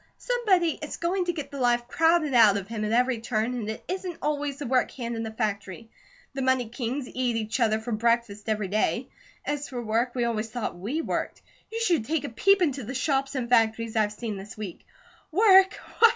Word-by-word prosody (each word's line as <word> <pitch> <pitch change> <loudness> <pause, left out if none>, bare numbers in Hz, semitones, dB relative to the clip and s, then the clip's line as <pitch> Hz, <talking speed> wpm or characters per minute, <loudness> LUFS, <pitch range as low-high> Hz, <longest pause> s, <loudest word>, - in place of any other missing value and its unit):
Somebody 395 -10 +1
is 300 - -5
going 360 +2 0
to 350 - +1
get 310 -5 -6
the 280 - -6
life 240 -1 +2
crowded 325 0 +2
out 220 -4 +6
of 195 -1 -5
him 220 -1 -4
at 210 - -1
every 245 0 +2
turn, 225 +1 -1
and 225 -4 -4
it 220 - -5
isn't 365 -2 -4
always 290 -2 -1
the 290 - -5
work 255 0 +2
hand 235 -2 -5
in 225 - -3
the 225 - -3
factory. 215 0 -4 0.4
The 270 - -3
money 260 -3 +1
kings 250 +2 -3
eat 250 -2 -1
each 225 +2 -2
other 220 -2 +2
for 230 +2 -6
breakfast 225 -1 0
every 215 -2 0
day. 210 +3 0 0.4
As 290 0 -3
for 250 - -5
work, 235 +2 0
we 245 - +1
always 225 -1 -2
thought 240 -4 -4
we 235 - -3
worked. - - -3 0.3
You 450 - -3
should 340 - +2
take 310 +1 -1
a - - -4
peep 380 - +3
into 280 -5 0
the 255 +5 -6
shops 270 +1 0
and 250 -3 -2
factories 230 -1 +2
I've 215 -2 +2
seen 210 -1 -5
this 195 +3 -9
week. 205 -5 -7 0.4
Work? 385 +1 +6
245 Hz, 210 wpm, -26 LUFS, 220-290 Hz, 0.4 s, out